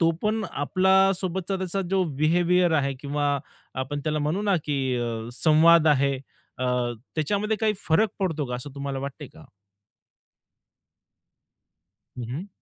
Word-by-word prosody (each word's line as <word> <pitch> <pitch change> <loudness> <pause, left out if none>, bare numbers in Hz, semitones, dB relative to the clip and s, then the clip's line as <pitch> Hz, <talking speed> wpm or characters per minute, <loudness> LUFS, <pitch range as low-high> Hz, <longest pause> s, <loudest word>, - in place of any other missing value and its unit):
तो 165 -1 +4
पण 215 +1 0
आपल्या 190 +6 +3
सोबतचा 190 +1 -2
त्याचा 190 +1 -2
जो 195 -1 +3 0.2
बिहेवियर 175 +2 +3
आहे 140 -3 +1
किंवा 145 0 -1 0.5
आपण 145 +2 -4
त्याला 155 -1 0
म्हणू 155 +7 -1
ना, 200 -3 +2
की 150 - -1 0.3
अ, 115 -1 -3
संवाद 160 +1 +6
आहे 140 -1 +3 0.4
अ, 130 - -2 0.5
त्याच्यामध्ये 205 +7 0
काही 220 -1 +2 0.2
फरक 190 +8 +4
पडतो 160 -6 -1
का? 125 - -4
असं 125 +4 -6
तुम्हाला 140 -1 -4
वाटतं 140 +2 -6
आहे - - -11
का? 160 -1 -14 2.7
हं, 120 - -4
हं. 165 +11 -5
160 Hz, 145 wpm, -25 LUFS, 145-190 Hz, 2.7 s, संवाद